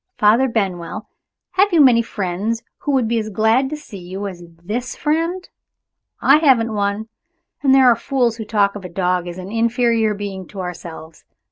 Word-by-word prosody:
Father 225 +5 +4
Benwell, 190 -7 -3 0.4
have 390 +2 +3
you 340 - +3
many 250 -5 +6
friends 210 +2 -3 0.2
who 290 - -2
would 255 -4 +2
be 230 0 +1
as 215 0 -4
glad 220 +6 +2
to 305 - -4
see 245 -9 -11
you 185 +3 -6
as 185 -3 -7 0.2
this 245 +6 -3
friend? 330 +4 -1 0.7
I - - +6
haven't 250 -8 +3
one. 205 +1 -1 0.5
And 270 -2 +4
there 265 -1 +6
are 245 -2 +6
fools 240 -1 0
who 225 - -5
talk 205 -2 +1
of 205 - -7
a 180 - -7
dog 180 0 -1
as 175 0 -7
an 185 +2 -8
inferior 230 -1 +1
being 195 -3 -6
to 200 - -10
ourselves! 170 -3 -8
220 Hz, 180 wpm, -19 LUFS, 195-250 Hz, 0.7 s, many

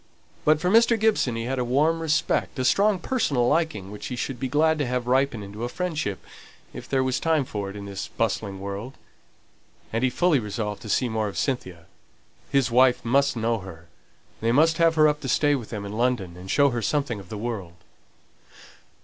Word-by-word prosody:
But 155 0 +4
for 180 +3 0
Mr. 230 +1 +5
Gibson 210 - +2
he 115 - -3
had 130 +2 -2
a - - +1
warm 150 +7 +2
respect, 155 -2 0
a 130 - -1
strong 200 +6 +3
personal 150 - 0
liking, 150 - 0
which 105 - -7
he 125 - -4
should 125 0 -4
be 130 - -2
glad 155 +3 +2
to 145 - +1
have 125 -1 -2
ripen 130 -3 +1
into 100 +3 -8
a 120 - -2
friendship, 155 - -3 0.5
if - - -9
there 135 -1 +2
was 130 -1 0
time 160 -4 +1
for 100 -4 -4
it 100 - -9
in 100 -1 -7
this 100 -1 -5
bustling 100 -3 -2
world. 100 +6 -6 1.0
And 115 +2 0
he 130 - +4
fully 150 +4 +2
resolved 105 -1 -4
to 110 - -9
see 125 +5 +2
more 110 -2 -1
of 100 - -6
Cynthia; 95 - -3 0.6
his 135 -3 +2
wife 125 0 +4
must 140 +3 +2
know 115 0 0
her; 85 -3 -11 0.5
they 115 +1 +1
must 160 +6 +3
have 165 -1 +4
her 155 -1 +6
up 150 0 0
to 135 - -4
stay 145 +3 +3
with 125 -6 -3
them 105 -3 -5
in 100 - -6
London, 110 -6 -1
and 90 +1 -11
show 140 +4 +4
her 120 -1 -2
something 140 -5 -1
of 95 -3 -13
the 110 - -5
world. 105 -6 -5
125 Hz, 210 wpm, -25 LUFS, 105-150 Hz, 1.0 s, her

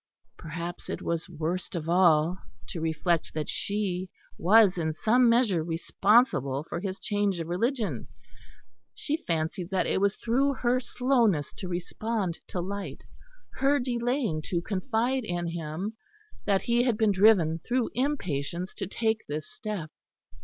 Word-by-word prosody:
Perhaps 170 +2 -6
it - - -4
was 170 +1 -2
worst 175 +4 -3
of 160 -2 -3
all 170 0 +4 0.3
to 165 - -5
reflect 160 +1 0
that 155 -1 -2
she 190 -3 -2 0.3
was 200 +1 +5
in 160 -1 0
some 235 +8 +4
measure 230 -8 +3
responsible 165 - +2
for 165 - -5
his 190 0 -4
change 205 -3 0
of 165 - -4
religion; 225 +6 -1 0.9
she 310 +3 -2
fancied 165 +2 -1
that 190 -2 +1
it - - 0
was 200 0 +2
through 270 +5 +1
her 250 0 +1
slowness 240 - +1
to 190 - -7
respond 180 +1 -2
to 180 - -4
light, 200 +3 -5 0.5
her 275 +1 +3
delaying 245 - -1
to 170 +2 -1
confide 225 +7 -1
in 175 -4 -2
him, 170 +6 -4 0.5
that 195 -2 +2
he 235 0 +2
had 245 -3 +1
been 220 -2 +3
driven 185 -5 +4
through 245 +6 -1
impatience 180 - -2
to - - -5
take 220 +2 0
this 150 +1 -4
step. 215 -10 -6
190 Hz, 145 wpm, -28 LUFS, 170-230 Hz, 0.9 s, was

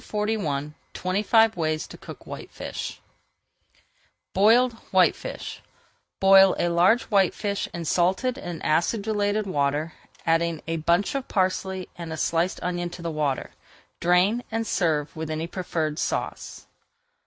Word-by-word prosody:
[Page - - -17
441] 185 -10 -1 0.2
TWENTY 185 +2 -1
FIVE 225 +1 +4
WAYS 155 -2 -1
TO - - -11
COOK - - -11
WHITEFISH - - -7 1.3
BOILED 230 +5 +5 0.2
WHITEFISH - - 0 0.6
Boil 195 0 +7
a 175 - +1
large 180 +8 +4
whitefish 200 0 0
in 170 -1 -5
salted 185 - +1
and 175 -2 -6
acidulated 205 +4 +1
water, 150 -2 -1 0.3
adding 165 0 +1
a 165 0 -1
bunch 170 +5 +1
of 275 -2 -3
parsley 190 -1 -1
and 165 -2 -6
a 160 - -4
sliced 170 +5 0
onion 175 -1 -2
to 175 0 -10
the 165 - -2
water. 150 -3 -2 0.5
Drain, 180 +7 +3
and 225 0 -2
serve 160 -7 0
with 160 -1 -5
any 155 +1 -2
preferred 165 -4 -3
sauce. - - -3
180 Hz, 130 wpm, -25 LUFS, 165-205 Hz, 1.3 s, Boil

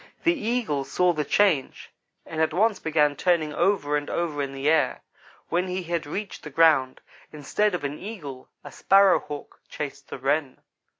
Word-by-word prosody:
The 340 - +4
Eagle 230 - -1
saw 175 +6 +1
the 150 -2 -1
change, 165 -3 +1 0.3
and 160 -1 -4
at 160 0 +1
once 215 +1 +2
began 150 -2 +2
turning 160 -2 +1
over 170 -4 +1
and 145 0 -2
over 160 -4 -2
in 140 -1 -3
the 135 +1 -3
air. 160 0 +2 0.5
When 180 +2 0
he 185 0 -3
had 170 -2 -3
reached 195 +6 -5
the 150 - -8
ground, 145 -4 +3 0.3
instead 180 +7 0
of 175 - -5
an 145 +1 -4
Eagle 150 - -8
a - - -10
Sparrow 195 -1 +4
hawk 145 -1 -9
chased 140 -1 -6
the - - -6
Wren. 135 +1 -1
160 Hz, 175 wpm, -25 LUFS, 145-185 Hz, 0.5 s, The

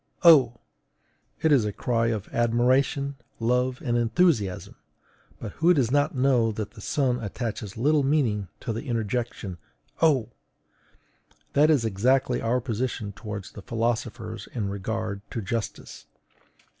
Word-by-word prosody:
O!_ 135 -9 +7 0.9
it 160 - +4
is 135 -6 +5
a 105 - -1
cry 115 +2 0
of 110 -3 -2
admiration, 130 +4 +1 0.2
love, 125 +4 0
and 120 -2 +1
enthusiasm; 120 - +1 0.7
but 110 - -6
who 175 +2 +5
does 125 -5 +1
not 145 +3 +2
know 125 -3 +3
that 105 -1 -5
the 110 - -13
sun 125 -1 0
attaches 105 -1 -5
little 145 +5 +3
meaning 130 -9 +1
to 115 - -3
the 115 - -5
interjection 115 -5 -3 0.4
O! 135 -9 +3 1.2
That 150 +2 +5
is 140 -7 +3
exactly 125 +5 +1
our 120 +2 +1
position 115 -3 -3
toward 105 -1 -6
the 105 - -9
philosophers 115 -1 -3
in 105 -5 -2
regard 100 0 -3
to - - -4
justice. 110 +2 -5
120 Hz, 130 wpm, -26 LUFS, 110-130 Hz, 1.2 s, O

